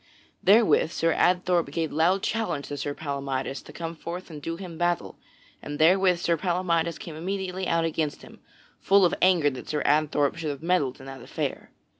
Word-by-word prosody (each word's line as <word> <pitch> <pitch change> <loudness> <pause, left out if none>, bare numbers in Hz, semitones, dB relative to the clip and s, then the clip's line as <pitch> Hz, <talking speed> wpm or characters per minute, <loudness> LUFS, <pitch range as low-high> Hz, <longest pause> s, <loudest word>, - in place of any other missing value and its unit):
Therewith 200 -7 +5
Sir 165 0 +1
Adthorp 180 -2 +2
gave 160 +1 -2
loud 175 +5 +2
challenge 225 -11 -2
to 145 - -4
Sir 145 +1 -3
Palamydes 140 -3 -3
to - - -12
come 165 +2 -6
forth 170 +2 -7
and 150 -2 -8
do 165 +3 -4
him 175 -2 -8
battle, 175 +1 -1 0.4
and 145 0 -6
therewith 180 +3 +4
Sir 170 -1 0
Palamydes 170 -1 0
came 165 - -8
immediately 185 +2 -3
out 165 0 +1
against 155 -2 -2
him, - - -14 0.4
full 195 -1 +4
of 175 - +2
anger 175 -6 +4
that 130 - -9
Sir 150 -1 -1
Adthorp 150 0 +2
should 160 -2 -3
have 145 +1 -6
meddled 165 -7 +1
in 135 - -11
that 135 0 -9
affair. - - -4
165 Hz, 185 wpm, -26 LUFS, 145-180 Hz, 0.4 s, Therewith